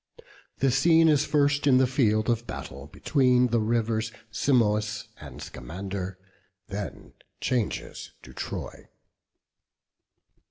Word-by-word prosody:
The 135 -1 +2
scene 165 +5 +5
is 150 -1 +4
first 145 -1 +2
in 130 -2 +6
the 130 - +5
field 110 -4 +1
of 120 -1 0
battle, 70 +2 -7
between 125 - +2
the 115 0 +2
rivers 110 0 0 0.2
Simois 105 -4 +1 0.2
and - - -10
Scamander, 95 +2 -6 0.5
and 100 - -7
then 100 -1 -6 0.3
changes 120 -5 -2
to - - -13
Troy. - - -6
115 Hz, 115 wpm, -27 LUFS, 105-135 Hz, 0.5 s, in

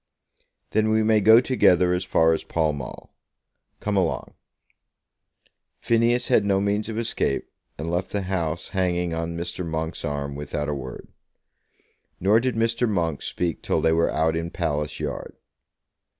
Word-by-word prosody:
"Then 110 0 +2
we 110 0 +3
may 110 -1 +3
go 110 +3 +8
together 90 -9 +3
as 90 +1 0
far 80 -3 +3
as 80 - -2
Pall 80 -2 0
Mall. 70 -3 -8 0.7
Come 105 0 -2
along." 90 -4 -1 1.5
Phineas 120 +1 +2
had 105 - +4
no 100 -1 +2
means 105 +2 0
of 110 - -4
escape, 115 -11 -1 0.3
and 80 - -5
left 90 +3 -1
the 100 -1 -2
House 85 -3 -2
hanging 90 -3 0
on 85 0 -3
Mr. 85 +1 -4
Monk's 80 0 -3
arm, 70 -1 -3
without 75 0 -4
a - - 0
word. 65 -3 -7 1.1
Nor 100 +5 +4
did 125 0 -1
Mr. 115 +1 +1
Monk 85 -7 -1
speak 85 -3 -2
till - - 0
they 80 - +3
were 85 0 +2
out 80 +1 +1
in 85 +1 -2
Palace 75 -2 -2
Yard. - - -5
90 Hz, 155 wpm, -24 LUFS, 80-105 Hz, 1.5 s, go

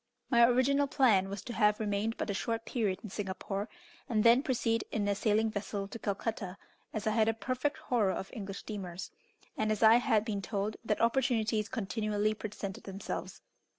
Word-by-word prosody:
My 235 -2 +6
original 260 +4 +4
plan 215 -9 +3
was 200 -1 -5
to 240 - -6
have 210 -2 +3
remained 210 +1 -1
but 210 - -2
a - - -1
short 225 +3 -2
period 210 -6 -1
in 215 - -7
Singapore, 195 +1 -4 0.4
and 215 -3 +2
then 235 +2 +7
proceed 230 -5 0
in 205 -2 0
a 200 - +3
sailing 215 +2 +1
vessel 205 -1 -3
to 230 +3 -8
Calcutta, 200 -2 -3 0.3
as 215 - -4
I 215 - +2
had 220 0 +3
a 225 - 0
perfect 255 +5 -1
horror 225 -6 +1
of 190 - -5
English 200 -5 -5
steamers, 185 -4 -6 0.4
and 215 0 0
as 215 +1 0
I 220 +1 +8
had 220 -3 +2
been 205 -3 -2
told 205 +2 -2
that 215 -2 0
opportunities 230 -3 +2
continually 215 -2 0
presented 205 -2 -6
themselves. 195 0 -6
215 Hz, 185 wpm, -32 LUFS, 200-230 Hz, 0.4 s, I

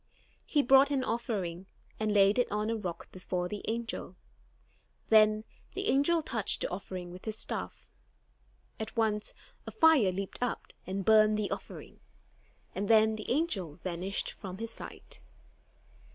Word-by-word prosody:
He 295 -2 +2
brought 270 +2 +6
an 275 -2 0
offering, 195 -8 -3 0.3
and 215 -1 0
laid 205 +2 +5
it 245 - +1
on 210 +2 0
a - - 0
rock 180 -6 -6
before 180 -1 -3
the 205 +2 -5
angel. 225 -5 -3 0.9
Then 215 -1 +5 0.3
the 390 +1 -1
angel 315 +4 +3
touched 220 -8 0
the - - -1
offering 180 -1 -6
with 180 +1 -11
his 220 -1 -3
staff. - - -4 0.9
At 220 +1 -6
once, 215 -2 0 0.3
a - - -4
fire 320 - +5
leaped 195 +4 -5
up 245 - -3
and 190 0 -3
burned 215 0 +6
the 210 -1 -2
offering; - - -7 0.7
and 200 +2 -2
then 220 0 +5
the 215 - -7
angel 230 - -1
vanished 185 +3 -3
from 190 -2 -8
his 230 +1 -4
sight. - - -9
215 Hz, 150 wpm, -31 LUFS, 190-235 Hz, 0.9 s, brought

